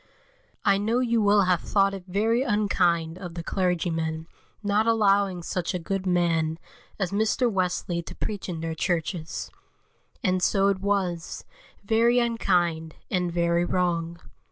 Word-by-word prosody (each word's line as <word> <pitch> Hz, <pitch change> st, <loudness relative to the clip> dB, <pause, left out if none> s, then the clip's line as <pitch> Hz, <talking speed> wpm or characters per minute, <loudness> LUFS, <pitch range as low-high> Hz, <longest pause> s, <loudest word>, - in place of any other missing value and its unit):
I 200 Hz, 0 st, +4 dB
KNOW 225 Hz, +4 st, +1 dB
you 235 Hz, -2 st, +1 dB
will 205 Hz, -1 st, +4 dB
have 180 Hz, -3 st, +2 dB
thought 195 Hz, -1 st, +2 dB
it 190 Hz, -2 st, -7 dB
very 220 Hz, +6 st, +1 dB
unkind 185 Hz, -8 st, +1 dB
of 175 Hz, -3 st, -8 dB
the 170 Hz, -, -5 dB
clergymen 165 Hz, -3 st, -1 dB, 0.4 s
not 205 Hz, +2 st, +2 dB
allowing 200 Hz, -5 st, +2 dB
such 180 Hz, +1 st, -2 dB
a -, -, +1 dB
good 190 Hz, +2 st, -3 dB
man 165 Hz, -3 st, +1 dB, 0.4 s
as 190 Hz, -4 st, -2 dB
Mr. 220 Hz, +4 st, +1 dB
Wesley 180 Hz, -2 st, -1 dB
to -, -, -10 dB
preach 205 Hz, -3 st, -4 dB
in 165 Hz, -3 st, -4 dB
their 165 Hz, 0 st, -3 dB
churches; 165 Hz, 0 st, -3 dB, 0.7 s
and 185 Hz, -3 st, +1 dB
so 195 Hz, +2 st, +3 dB
it 195 Hz, -1 st, 0 dB
was, 190 Hz, -4 st, -2 dB, 0.4 s
very 230 Hz, +3 st, +3 dB
unkind, 175 Hz, -9 st, +1 dB, 0.2 s
and 180 Hz, -2 st, 0 dB
very 170 Hz, 0 st, +1 dB
wrong. 170 Hz, -2 st, -1 dB
185 Hz, 145 wpm, -26 LUFS, 170-205 Hz, 0.7 s, I